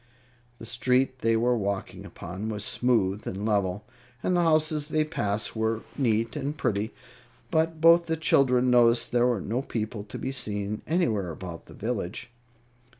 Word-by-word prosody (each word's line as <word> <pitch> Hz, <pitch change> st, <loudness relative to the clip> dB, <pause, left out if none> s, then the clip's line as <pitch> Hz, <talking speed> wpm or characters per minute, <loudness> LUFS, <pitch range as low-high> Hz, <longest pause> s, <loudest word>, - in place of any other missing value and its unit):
The 115 Hz, -, -10 dB
street 130 Hz, +3 st, +1 dB
they 115 Hz, -1 st, +2 dB
were 120 Hz, +2 st, +2 dB
walking 100 Hz, -3 st, -3 dB
upon 95 Hz, +5 st, -6 dB
was 105 Hz, -1 st, -4 dB
smooth 110 Hz, -6 st, +1 dB
and 100 Hz, +2 st, -4 dB
level, 100 Hz, -2 st, 0 dB, 0.4 s
and 185 Hz, -, +1 dB
the 175 Hz, -, +3 dB
houses 155 Hz, -2 st, +2 dB
they 155 Hz, 0 st, +1 dB
passed 105 Hz, -9 st, -2 dB
were 110 Hz, 0 st, -1 dB
neat 115 Hz, -4 st, +1 dB
and 145 Hz, +1 st, -3 dB
pretty; 110 Hz, -4 st, -1 dB, 0.6 s
but 160 Hz, -1 st, +1 dB
both 170 Hz, +1 st, +6 dB
the 160 Hz, 0 st, 0 dB
children 130 Hz, -5 st, +3 dB
noticed 120 Hz, -1 st, +4 dB
there 120 Hz, 0 st, +3 dB
were 120 Hz, -4 st, +1 dB
no 115 Hz, +7 st, -2 dB
people 110 Hz, -5 st, -4 dB
to 105 Hz, -, -8 dB
be 130 Hz, -, -3 dB
seen 105 Hz, -5 st, -3 dB
anywhere 115 Hz, -, +1 dB
about 85 Hz, 0 st, -8 dB
the -, -, -13 dB
village. 115 Hz, +1 st, -4 dB
115 Hz, 160 wpm, -27 LUFS, 105-135 Hz, 0.6 s, both